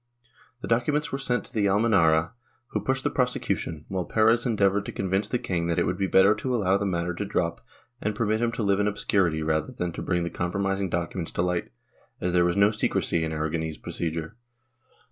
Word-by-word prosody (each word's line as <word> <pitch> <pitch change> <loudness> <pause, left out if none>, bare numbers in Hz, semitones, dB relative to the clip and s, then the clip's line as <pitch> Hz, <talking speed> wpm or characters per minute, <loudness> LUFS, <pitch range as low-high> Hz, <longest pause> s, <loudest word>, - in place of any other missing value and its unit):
The - - -5
documents 145 +6 +1
were 135 - -2
sent 125 -2 -1
to 120 -3 -4
Almenara, 95 -6 +3 0.4
who - - -1
pushed 130 0 0
the 145 - 0
prosecution, 125 - -1
while 95 -1 -2
Perez 115 +5 +3
endeavored 100 -3 +2
to - - -4
convince 100 +2 -1
the 125 - +1
king 85 -7 -2
that 85 - 0
it - - +2
would 90 - -2
be 95 - +1
better 95 +2 +5
to 130 +2 -2
allow 95 -4 +2
the 100 0 0
matter 85 -1 -1
to 95 - -3
drop 85 -4 -1 0.4
and 105 0 -1
permit 110 0 0
him 120 -1 +1
to 115 - -2
live 100 -1 +2
in 105 - +2
obscurity 95 -6 +1
rather 80 -1 0
than 90 -1 -3
to - - -6
bring 90 -2 0
the 85 - -3
compromising 95 +2 -1
documents 85 0 -3
to 85 - 0
light, 90 -1 -1 0.5
as 90 0 -1
there 90 -1 +4
was 85 +1 0
no 100 +1 +5
secrecy 85 -5 0
in 80 - -2
Aragonese 80 0 -2
procedure. 80 +4 -4
95 Hz, 205 wpm, -26 LUFS, 85-110 Hz, 0.5 s, better